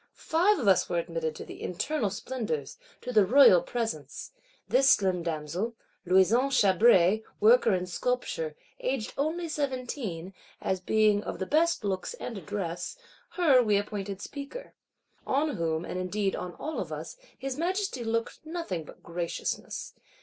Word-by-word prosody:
Five 360 +6 +2
of 240 - -2
us 190 - +4
were 175 - 0
admitted 165 -2 -2
to - - -8
the - - -10
internal 215 - -1
splendours, 200 - -4 0.2
to 250 - -5
the 215 -3 +6
Royal 205 -5 +7
Presence. 170 - -4 0.4
This 260 +6 +4
slim 190 -6 +3
damsel, 170 +7 -3 0.3
"Louison 190 +9 +4
Chabray, 205 -3 +5 0.2
worker 225 -1 +5
in 180 0 -2
sculpture, 180 -6 -2 0.2
aged 255 -4 -2
only 320 +5 -1
seventeen," 255 - -3 0.3
as 190 - -1
being 210 +2 +3
of - - -5
the 190 - -3
best 325 - +2
looks 195 - -2
and 245 - -6
address, 180 - -4 0.4
her 300 -8 +5
we 210 -4 +3
appointed 200 -1 -4
speaker. 285 - -8 0.5
On 285 -1 +1
whom, 165 0 -1
and 180 - -4
indeed 195 +2 -1
on 180 -1 -6
all 310 +1 -4
of - - -4
us, - - -6 0.2
his 270 -1 -4
Majesty 360 -4 -1
looked 230 +4 -2
nothing 315 - -4
but - - -14
graciousness. 170 0 -4
215 Hz, 150 wpm, -28 LUFS, 180-270 Hz, 0.5 s, Royal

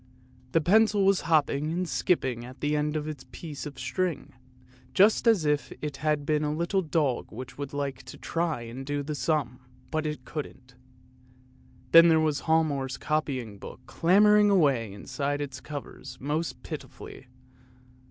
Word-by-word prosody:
The 165 - +4
pencil 205 +3 +4
was 195 -1 +3
hopping 150 -2 +2
and 180 +2 -1
skipping 130 -10 0
at 130 +2 -11
the 150 +1 0
end 150 +1 0
of 155 0 -2
its 150 -4 -6
piece 150 -3 -7
of 140 - -10
string, 160 +7 -3 0.6
just 210 +4 +4
as 210 -9 +4
if 150 -1 0
it 150 -2 -5
had 150 -1 0
been 155 -1 +1
a 150 - 0
little 170 +5 0
dog 150 -6 -1
which 125 +5 -9
would 140 -1 -4
like 140 -2 -3
to 125 - -10
try 165 -6 -2
and 120 +3 -7
do 145 +1 -2
the 150 +2 -4
sum, 135 -3 -1 0.3
but 155 -1 -1
it 150 -4 -5
couldn't! 130 -4 -7 1.2
Then 165 +1 +9
there 160 -1 +5
was 155 -2 +1
Hialmar's 145 -5 +1
copybook 130 -9 -3
clamouring 210 +4 +4
away 140 - +3
inside 140 +8 -3
its 135 -3 -5
covers 145 -2 -8
most 150 +4 -3
pitifully. - - -9
150 Hz, 155 wpm, -27 LUFS, 135-165 Hz, 1.2 s, Then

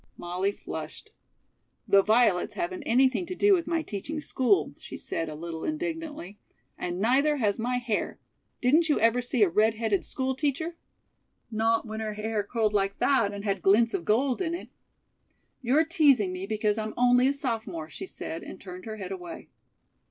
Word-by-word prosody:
Molly 180 +3 -1
flushed. - - -8 0.8
"The 200 -1 +6
violets 215 -3 +2
haven't 355 0 -3
anything 260 +7 +3
to 365 - -5
do 405 +2 +4
with 345 -4 +1
my 330 -1 0
teaching 285 +7 -5
school," 295 +5 +1
she - - -8
said 165 -1 -3
a 155 - -6
little 165 +1 -6
indignantly. 310 - -4 0.4
"And 175 0 -4
neither 275 +8 +3
has 210 -4 0
my 250 +2 0
hair. 240 -4 -2 0.4
Didn't 310 +6 +4
you 295 - +3
ever 230 +2 +3
see 245 -2 +2
a - - +5
red 215 +5 +3
headed 215 -3 0
school 265 0 -2
teacher?" 300 +5 -2 0.8
"Not 225 +1 +1
when 220 -1 -5
her 215 -1 -3
hair 215 0 -1
curled 215 +1 -1
like 195 -1 0
that 260 -8 +2
and 200 0 -7
had 200 -1 -1
glints 225 +4 +4
of 170 - -2
gold 245 - +1
in 340 -2 -1
it." - - -8 0.9
"You're 275 +6 +3
teasing 280 - +3
me 185 +1 -5
because 215 0 0
I'm 215 0 -4
only 245 +1 +5
a - - +3
sophomore," 225 - -3
she - - -7
said, 165 - -6
and - - -9
turned 185 -1 -9
her 220 -1 -6
head 195 -2 -6
away. 180 -3 -8
225 Hz, 180 wpm, -27 LUFS, 200-275 Hz, 0.9 s, The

